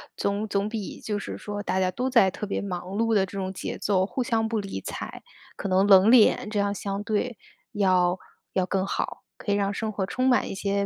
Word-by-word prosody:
总 200 +2 -1
总 200 0 0
比 215 -3 -5
就 210 -1 -2
是 - - -6
说 205 -1 -5
大 190 - -1
家 185 -1 +1
都 250 +7 -2
在 230 -7 +5
特 210 - -5
别 - - -2
忙 180 -3 -4
碌 225 +1 +1
的 200 -3 +4
这 195 +1 -9
种 190 -1 -2
节 - - -5
奏， 190 -2 +1
互 250 +5 -2
相 225 -3 +1
不 220 -1 -1
理 195 -1 -5
睬， - - -6 0.4
可 - - -3
能 190 +1 +3
冷 195 +1 +7
脸 230 -3 +5
这 210 -1 -1
样 200 0 +1
相 200 0 -4
对 220 +3 -1 0.4
要 185 -3 +3 0.4
要 185 - +1
更 190 +1 0
好， - - -3
可 205 - -3
以 - - +3
让 200 0 0
生 220 +1 -2
活 195 -2 -2
充 255 +6 0
满 245 -4 +2
一 - - -5
些 200 +1 0
200 Hz, 250 characters per minute, -26 LUFS, 190-215 Hz, 0.4 s, 冷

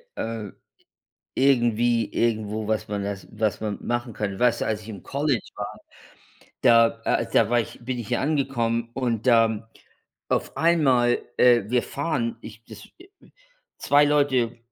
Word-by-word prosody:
äh 110 -3 -4 0.9
irgendwie, 120 -4 +2
irgendwo, 110 -2 -1
was 110 0 -1
man 100 -1 -3
das 100 -1 -5
was 110 -2 -1
man 105 -2 -3
machen 120 0 -2
kann. 100 -2 -3
Weißt 125 -1 +2
du, - - -1
als 110 -1 -1
ich 105 - -13
im 100 -5 -8
College 140 -4 -1
war, - - -6 0.8
da, 115 -1 +4
äh - - +1
da 115 -1 +3
war 120 - +3
ich 115 - -5
bin 125 +1 -3
ich 115 - -6
hier - - -1
angekommen 120 -6 -1
und 120 -3 -2
da 115 -2 +3 0.6
auf - - -1
einmal, 135 -8 +3 0.2
äh 120 -3 +5
wir 125 +1 +1
fahren, 140 -6 -2
ich 115 - -12
das 105 -2 -12
äh 370 - -15 0.7
2 145 +1 +4
Leute 135 -5 +1
115 Hz, 155 wpm, -24 LUFS, 110-130 Hz, 0.9 s, äh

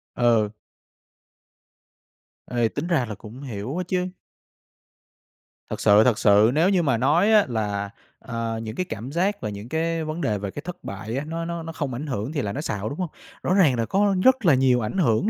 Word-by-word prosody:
Ừ. 115 -3 +3 2.0
Ê, 120 -2 +2
tính 155 +4 -4
ra 155 -8 +2
là 105 -2 -6
cũng 115 +6 -11
hiểu 125 - -5
á 185 - -1
chứ. 180 0 0 1.6
Thật - - -4
sự, 105 +1 +6
thật 120 -3 +2
sự 105 +3 +5
nếu 165 +5 +3
như 185 -3 +2
mà 130 -6 +2
nói 160 - +3
á 210 -2 +6
là, 105 -3 -2 0.3
ờ, 115 -1 -4
những 110 0 -6
cái 185 - -1
cảm 125 - -6
giác 190 +5 0
và - - -3
những 105 +3 -8
cái 165 0 -1
vấn 155 +2 -4
đề 105 -7 0
về 100 -1 -5
cái 145 - -6
thất 180 0 -7
bại 110 +4 -5
á, 140 - -3
nó 165 +1 -3
nó 170 -1 -4
nó 165 - -6
không 145 -6 -3
ảnh 145 +5 -5
hưởng 125 0 -3
thì 145 - -1
là 100 -3 -3
nói 145 - -3
xạo, 105 -8 -3
đúng 145 - -7
hông? 180 -3 -2 0.3
Rõ 180 - +1
ràng 170 -10 +4
là 115 -1 0
có 200 - +2
rất 260 -4 +4
là 165 - +6
nhiều 130 -2 +3
ảnh 110 - -3
hưởng 170 - +2
135 Hz, 215 wpm, -24 LUFS, 110-170 Hz, 2.0 s, sự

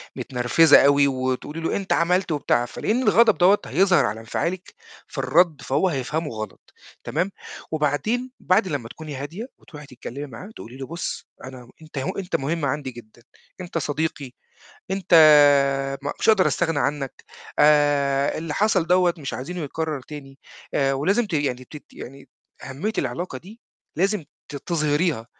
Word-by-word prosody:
متنرفزة 130 +5 +4
أوي 140 0 +5
وتقُولِي 130 +4 -3
له 165 - -1
أنت 195 -1 -1
عملت 180 +1 +1
وبتاع، 125 -5 +1
فلإن 230 - -1
الغضب 230 -3 +4
دوّة 190 +3 +5
هيظهر 180 +8 +3
على 105 +2 -3
انفعالِك 175 +11 -4 0.3
في - - -13
الرد 155 +1 +2
فهو 150 +9 +1
هيفهمه 150 +3 -2
غلط، 110 -2 -8 0.3
تمام؟ 190 +2 -1 0.4
وبعدين 155 - -1
بعد 190 +2 +2
لمّا 140 -8 -4
تكوني 155 -1 -8
هادية 165 - -6
وتروحي 150 -2 -13
تتكلمي 130 +2 -8
معاه 140 - -10
تقُولي 125 +3 -10
له 135 - -7
بُص 170 +2 -5 0.2
أنا 130 -2 -10
أنت 155 -2 -12
هو 135 - -1
أنت 190 -2 -3
مهم 150 +3 -1
عندي 140 -1 -2
جدًا، 120 -1 -15 0.4
أنت 175 -2 -5
صديقي، 145 -2 -3 0.6
أنت 190 -2 0 0.9
م 145 - -2
مش - - 0
هاقدر 210 -4 +5
أستغنى 165 -3 0
عنّك، 140 -2 -3 0.3
آآ 145 -2 +3
اللي 160 -1 -4
حصل 200 -5 +2
دوّة 180 0 +3
مش 140 -4 -5
عايزينه 175 +8 -5
يتكرر 155 0 -3
تاني، 135 -2 -11 0.5
ولازم 195 - +1
ت 205 - -11
يعني 130 -4 -1
تت 150 - -10
يعني 135 +2 -11 0.4
أهميّة 145 +12 -4
العلاقة 130 +2 -3
دي 210 - -15 0.4
لازم 195 0 0 0.2
ت 145 - -7
تظهريها، 150 -4 -1
150 Hz, 150 wpm, -23 LUFS, 135-180 Hz, 0.9 s, أوي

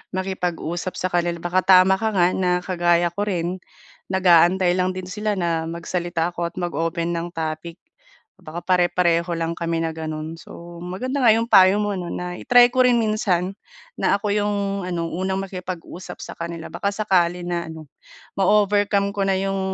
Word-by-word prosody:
makipag-usap 180 -2 -3
sa 185 - 0
kanila. 175 -1 -1
Baka 175 +2 0
tama 190 0 +6
ka 220 +2 -1
nga 180 -2 +2
na 180 -1 +1
kagaya 175 -2 +1
ko 205 - -1
rin, 180 -2 -3 0.5
nag-aantay 180 0 +4
lang 185 0 +1
din 185 -1 -7
sila 210 +3 -2
na 165 -2 0
magsalita 170 0 -2
ako 175 - -3
at - - -35
mag-open 170 0 -2
ng 170 0 -3
topic. 160 +1 -5 0.6
Baka 160 +2 -7
pare-pareho 175 -1 +2
lang 165 0 -2
kami 165 -1 -2
na 160 -1 -3
gano'n. 155 0 -5
So, 170 0 -11
maganda 255 +10 -3
nga 230 - +7
'yong 230 +1 +1
payo 190 +2 +7
mo 205 -1 -1
'no, 175 -2 -5
na 180 0 -5
i-try 245 0 +6
ko 255 0 +3
rin 245 -1 +4
minsan 195 -4 0 0.4
na - - +3
ako 210 - -4
yung 205 0 0 0.3
ano, 170 -2 -2
unang 190 +2 -2
makipag-usap 185 -1 -7
sa - - -8
kanila 170 -1 -6
baka 195 +4 -2
sakali 180 -4 +1
na 175 -1 -2
ano, 160 -2 -9 0.5
ma-overcome 205 0 +2
ko 200 - 0
na 195 - +2
yung 195 0 -1
180 Hz, 170 wpm, -22 LUFS, 170-195 Hz, 0.6 s, nga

